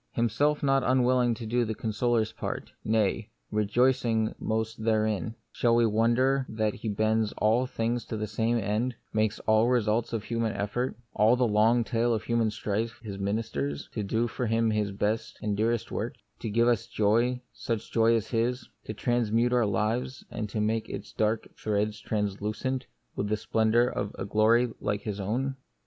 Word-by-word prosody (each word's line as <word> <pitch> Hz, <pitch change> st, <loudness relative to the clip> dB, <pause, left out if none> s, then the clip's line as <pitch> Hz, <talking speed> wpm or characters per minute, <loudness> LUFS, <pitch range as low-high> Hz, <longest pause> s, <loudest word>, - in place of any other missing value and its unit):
Himself 130 Hz, +7 st, +1 dB
not 135 Hz, -1 st, +3 dB
unwilling 125 Hz, -1 st, +3 dB
to 115 Hz, -, -7 dB
do 120 Hz, +2 st, +1 dB
the 110 Hz, -1 st, -3 dB
consoler's 110 Hz, +1 st, 0 dB
part -, -, -5 dB
— -, -, -42 dB
nay, 110 Hz, 0 st, +1 dB, 0.2 s
rejoicing 110 Hz, +1 st, +2 dB
most 110 Hz, 0 st, -2 dB
therein 110 Hz, 0 st, 0 dB
— -, -, -48 dB
shall 115 Hz, -1 st, +2 dB
we 120 Hz, 0 st, +4 dB
wonder 120 Hz, +5 st, +2 dB
that 110 Hz, -1 st, 0 dB
He 110 Hz, -, -5 dB
bends 110 Hz, +1 st, +1 dB
all 115 Hz, +4 st, +2 dB
things 120 Hz, 0 st, -1 dB
to 110 Hz, -, -4 dB
the 105 Hz, -, -2 dB
same 110 Hz, +3 st, 0 dB
end, 110 Hz, +4 st, -1 dB, 0.2 s
makes 110 Hz, 0 st, +1 dB
all 110 Hz, +1 st, +3 dB
results 115 Hz, -2 st, +1 dB
of 115 Hz, -3 st, -2 dB
human 115 Hz, -2 st, -1 dB
effort, 120 Hz, +6 st, -2 dB, 0.2 s
all 110 Hz, +3 st, +4 dB
the 125 Hz, -1 st, +2 dB
long 110 Hz, +3 st, +4 dB
tale 115 Hz, 0 st, +1 dB
of 110 Hz, -, -3 dB
human 115 Hz, -2 st, +1 dB
strife, 110 Hz, +2 st, -3 dB
His 100 Hz, -3 st, -6 dB
ministers, 100 Hz, -9 st, -2 dB
to 110 Hz, -, -2 dB
do 110 Hz, +4 st, 0 dB
for 120 Hz, +1 st, -3 dB
Him 115 Hz, 0 st, +2 dB
His 105 Hz, -2 st, 0 dB
best 105 Hz, +3 st, -2 dB
and 105 Hz, -1 st, -1 dB
dearest 115 Hz, +2 st, 0 dB
work; -, -, -3 dB, 0.2 s
to 115 Hz, -, -4 dB
give 115 Hz, +3 st, +3 dB
us 120 Hz, -1 st, +2 dB
joy, 120 Hz, +3 st, +2 dB
such 115 Hz, -2 st, -4 dB
joy 115 Hz, 0 st, +4 dB
as 115 Hz, -, -1 dB
His; 120 Hz, +2 st, 0 dB, 0.2 s
to 110 Hz, -, -5 dB
transmute 120 Hz, +1 st, +1 dB
our 120 Hz, -3 st, +3 dB
life, 110 Hz, +6 st, -1 dB
and 105 Hz, -2 st, -4 dB
make 110 Hz, +1 st, -1 dB
its -, -, -7 dB
dark 110 Hz, +1 st, 0 dB
threads 105 Hz, 0 st, -1 dB
translucent 105 Hz, +5 st, -2 dB, 0.3 s
with 105 Hz, -, -2 dB
the 110 Hz, -, +1 dB
splendour 110 Hz, +2 st, +2 dB
of 105 Hz, -4 st, -3 dB
a 95 Hz, -, -3 dB
glory 115 Hz, +4 st, +3 dB
like 105 Hz, 0 st, -1 dB
His 105 Hz, -1 st, -4 dB
own 130 Hz, +7 st, -1 dB
110 Hz, 180 wpm, -28 LUFS, 105-120 Hz, 0.3 s, we